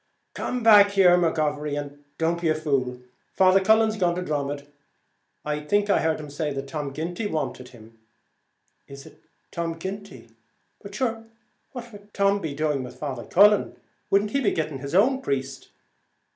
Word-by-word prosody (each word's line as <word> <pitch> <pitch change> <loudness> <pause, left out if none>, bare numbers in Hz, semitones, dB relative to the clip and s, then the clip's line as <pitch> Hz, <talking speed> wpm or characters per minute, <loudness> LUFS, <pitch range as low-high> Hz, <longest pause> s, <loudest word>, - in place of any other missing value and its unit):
"Come 250 -1 -3
back, 210 -3 +8
McGovery, 155 -6 +2
and 145 0 -9
don't 165 +1 0
be 165 - +1
a 155 - +2
fool. 130 -5 -2 0.3
Father 190 0 +5
Cullen's 220 +1 +3
gone 175 -3 +1
to 180 - -3
Dromod. 145 -3 -3 0.8
I 150 0 -2
think 205 +7 0
I - - +3
heard 160 -1 0
him 150 -2 -9
say 145 -1 -3
Tom 145 0 -5
Ginty 175 +8 -4
wanted 140 -7 -4
him." 115 -2 -17 0.9
"Is 140 0 -11
it - - -17 0.3
Tom 165 -1 -3
Ginty? 190 - -8 0.5
but 200 0 -10
shure 225 -1 -2 0.5
what 240 -2 -8
would 205 0 -15
Tom 200 0 +2
be 155 -5 -4
doing 150 -2 -1
with 125 - -9
Father 130 -5 -5
Cullen? 205 +2 +4 0.3
wouldn't 200 +1 +2
he 275 - 0
be 225 - +2
going 155 -1 -2
to 140 - -5
his 140 +4 -5
own 260 +7 +3
priest? 135 - -4
160 Hz, 165 wpm, -24 LUFS, 145-200 Hz, 0.9 s, back